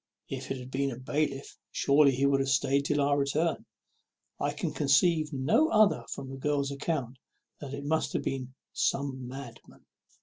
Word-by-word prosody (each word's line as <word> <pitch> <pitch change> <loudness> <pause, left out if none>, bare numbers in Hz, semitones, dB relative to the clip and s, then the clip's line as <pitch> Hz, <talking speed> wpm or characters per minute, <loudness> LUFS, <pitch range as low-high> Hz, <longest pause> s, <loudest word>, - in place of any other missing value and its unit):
If 130 -1 -5
it 135 - -2
had 125 0 -9
been 140 +1 0
a 120 - -6
bailiff, 140 +1 -2
surely 140 +1 +4
he 135 +2 +1
would 140 -1 +3
have 135 0 0
staid 135 +1 +2
till 145 0 +1
our 140 0 +3
return. 150 +4 0 0.7
I 145 - 0
can 150 +2 -3
conceive 155 +2 +3
no 150 - +2
other 215 -1 +4
from 135 - -6
the 135 - -7
girl's 140 0 0
account 140 -3 -3 0.4
than 145 - -7
that 140 - -5
it 140 - -7
must 160 +2 0
have - - -1
been 130 -1 -4 0.2
some 135 -2 -1
madman." 125 -2 -10
140 Hz, 180 wpm, -29 LUFS, 135-150 Hz, 0.7 s, surely